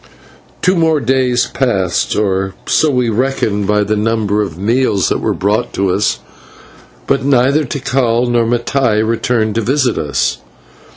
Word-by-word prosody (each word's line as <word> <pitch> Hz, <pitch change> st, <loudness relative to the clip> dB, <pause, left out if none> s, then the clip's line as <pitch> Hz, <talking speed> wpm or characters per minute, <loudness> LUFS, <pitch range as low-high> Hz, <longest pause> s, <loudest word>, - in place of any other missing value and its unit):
Two 185 Hz, +1 st, +3 dB
more 160 Hz, -3 st, +2 dB
days 125 Hz, -1 st, +1 dB
passed, 95 Hz, -9 st, -1 dB
or 95 Hz, -2 st, -1 dB
so 155 Hz, -, +2 dB
we 125 Hz, -4 st, +1 dB
reckoned 110 Hz, -4 st, -1 dB
by 105 Hz, 0 st, +2 dB
the 105 Hz, +1 st, -1 dB
number 105 Hz, -1 st, 0 dB
of 95 Hz, -6 st, -4 dB
meals 110 Hz, 0 st, +1 dB
that -, -, 0 dB
were -, -, -1 dB
brought 105 Hz, +3 st, -1 dB
to 95 Hz, -1 st, 0 dB
us, 100 Hz, +2 st, 0 dB, 0.9 s
but 135 Hz, -, 0 dB
neither 140 Hz, +2 st, +2 dB
Tikal 125 Hz, -2 st, 0 dB
nor 120 Hz, -1 st, +1 dB
Mattai 120 Hz, -2 st, 0 dB
returned 115 Hz, -1 st, 0 dB
to 115 Hz, -, -1 dB
visit 130 Hz, +1 st, 0 dB
us. 70 Hz, -2 st, -1 dB
115 Hz, 150 wpm, -15 LUFS, 105-130 Hz, 0.9 s, Two